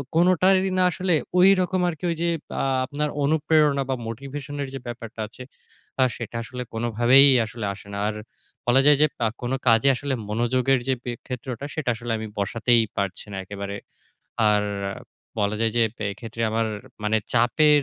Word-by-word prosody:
কোনটারি 185 +2 +4
না 185 - +4
আসলে 180 0 0 0.3
ঐরকম 185 -1 +4
আরকি 160 -1 -8
ওইযে 170 +1 -1 0.3
আ - - 0 0.2
আপনার 150 +3 -2
অনুপ্রেরণা 150 -1 +3
বা 130 - +1
motivation 140 +5 -6
এর 140 - -3
যে, 135 - -4
ব্যাপারটা 115 -2 -7
আছে, 125 +4 -11 0.6
আ - - +7
সেটা 120 -1 -7
আসলে 125 +2 -6
কোনভাবেই 120 +4 +5 0.2
আসলে 110 -1 -6
আসে 100 0 -14
না। - - -4
আর 105 - -2 0.5
বলা 130 +2 +5
যায় 145 -1 +6
যে, 155 - +7 0.2
আ - - +4
কোন 120 0 -3 0.2
কাজে 115 +3 +5
আসলে 140 +2 -3 0.2
মনোযোগের 125 +4 +1
যে, 130 - +3 0.3
ক্ষেত্রওটা 125 +1 -5
সেটা 155 -5 -2
আসলে 120 +1 -5
আমি 110 0 -5
বসাতেই 115 +3 +2
পারছি 100 -2 -2
না - - -4
একেবারে। 100 +1 -6 0.8
আর 105 0 +3 0.8
বলা 105 0 +1
যায় 115 0 +2
যে, 120 - +4 0.3
এক্ষেত্রে 115 +2 -6
আমার 115 +1 0 0.4
মানে 110 +1 +2 0.2
চাপের 145 +5 +4
125 Hz, 160 wpm, -24 LUFS, 115-150 Hz, 0.8 s, আ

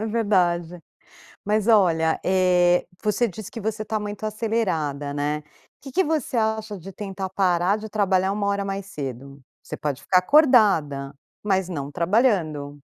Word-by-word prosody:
é 220 - -2
verdade, 180 -6 0 0.6
mas 210 +2 0
olha, 165 -7 +3
eh, 180 -1 +3 0.2
você 220 +3 +1
disse 210 +2 -9
que 230 - -7
você 215 +1 -3
tá 215 0 -2
muito 210 0 -6
acelerada, 185 -11 -2
né? 150 +1 -2 0.4
Que 270 - -10
que 380 - +3
você 305 -6 -1
acha 220 -2 -1
de 195 +3 -10
tentar 195 -1 -5
parar 185 0 +1
de 215 0 -8
trabalhar 195 -2 +1
1 205 0 -2
hora 200 0 0
mais 195 0 -4
cedo? 140 -5 -7 0.2
Você - - -7
pode 145 -3 -3
ficar 185 - +3
acordada, 185 - +3 0.3
mas 190 -3 0
não 145 -5 -5
trabalhando. 170 - 0
195 Hz, 155 wpm, -23 LUFS, 165-215 Hz, 0.6 s, olha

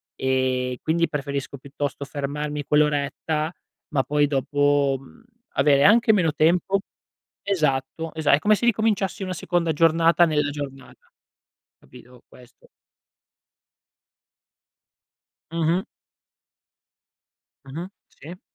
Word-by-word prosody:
ehm, 130 -1 0
quindi, 170 +1 0
preferisco, 140 -1 -4
piuttosto, 140 +1 -5
fermarmi 145 +1 -4
quell'oretta, 150 +2 0 0.4
ma 140 -4 +1
poi, 145 0 +1
dopo, 145 0 +1
mhmm, 135 - -18 0.3
avere 140 0 +4
anche 220 +1 +5
meno 170 -6 +2
tempo 175 +6 +2 0.6
esatto, 155 -3 -1
esa 160 -2 +1
è - - +4
come 215 +5 +3
se 235 - -1
ricominciassi 210 -4 0
una 185 -1 -3
seconda 170 -1 -1
giornata 165 +2 +4
nella 150 -2 0
giornata, 135 -3 -9 0.7
capito? 125 0 -17
Questo. 125 -1 -19 2.8
Mh-mh. 165 +2 0 1.8
Mh-mh. 160 +7 -7 0.2
Sì. 175 +5 -12
150 Hz, 95 wpm, -23 LUFS, 140-170 Hz, 2.8 s, anche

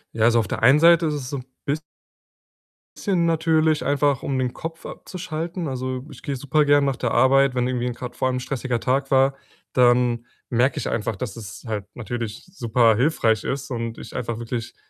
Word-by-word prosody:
Ja, 110 0 +3
also, 115 0 +5
auf 110 - -1
der - - -4
einen 130 +6 +6
Seite 170 0 +6
ist 150 - -1
es 130 -3 -5
so 140 - -2
'n 130 - -7 0.2
biss 150 +2 -1 1.2
sschen 185 -5 +1
natürlich 160 -1 +2
einfach, 145 -1 +1
um 135 -2 -2
den 125 -2 -1
Kopf 165 0 -7
abzuschalten. 170 -1 -5
Also, 130 0 -4
ich - - -12
gehe 140 -3 -3
supergern 145 +1 +3
nach 135 -2 0
der 120 - -1
Arbeit, 130 +2 +4
wenn 125 0 +1
irgendwie 125 -1 -1
'n 125 - -2
grad 125 0 -7
vor 130 - 0
allem 130 0 0
'n - - -1
stressiger 125 -2 -2
Tag 135 +3 0
war. 135 0 +4 0.4
Dann 120 -1 +3 0.2
merke 125 +2 +2
ich - - -2
einfach, 110 0 -2
dass 100 +1 -5
es 105 -5 -9
halt 105 -4 -3
natürlich 115 -2 -5
superhilfreich 115 - +2
ist 135 0 -3
und 115 -2 -3
ich - - -10
einfach 115 -2 -3
wirklich 115 0 -5
130 Hz, 195 wpm, -23 LUFS, 120-145 Hz, 1.2 s, einen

